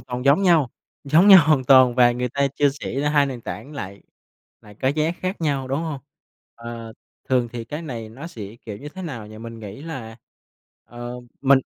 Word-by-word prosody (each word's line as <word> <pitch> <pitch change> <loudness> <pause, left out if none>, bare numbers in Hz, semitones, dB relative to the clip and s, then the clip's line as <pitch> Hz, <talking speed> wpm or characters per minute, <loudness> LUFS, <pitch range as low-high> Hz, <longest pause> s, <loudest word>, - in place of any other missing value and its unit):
toàn 125 +1 -6
giống 140 +7 +5
nhau 165 -9 +4 0.3
giống 160 +8 +5
nhau 190 -2 +11
hoàn 150 -4 +3
toàn 130 -2 +6
và 120 -1 +6
người 125 +1 -2
ta 140 +3 +1
chia 145 0 +3
sẻ 135 - -3
ra 145 - +1
2 145 -1 +4
nền 130 -3 -5
tảng 135 +4 -7
lại 100 -8 -7 0.6
lại 105 -1 -15
có 130 - +3
giá 155 +3 +1
khác 185 0 -3
nhau, 140 -5 -1
đúng 135 - 0
hông? 155 -5 -4 0.5
Ờ, 115 -1 -8 0.4
thường 125 -2 +2
thì 120 -1 -5
cái 150 +8 -6
này 120 -8 -6
nó 135 +9 -9
sẽ, 110 - -9
kiểu 105 -2 -5
như, 145 - -8
thế 190 +5 -9
nào 125 - -6
nhỉ? 110 0 -11
Mình 115 0 -9
nghĩ 105 +5 -9
là, 130 -9 -7 0.7
ờ, 120 +1 -8 0.2
mình 140 0 +5
130 Hz, 210 wpm, -23 LUFS, 115-150 Hz, 0.7 s, nhau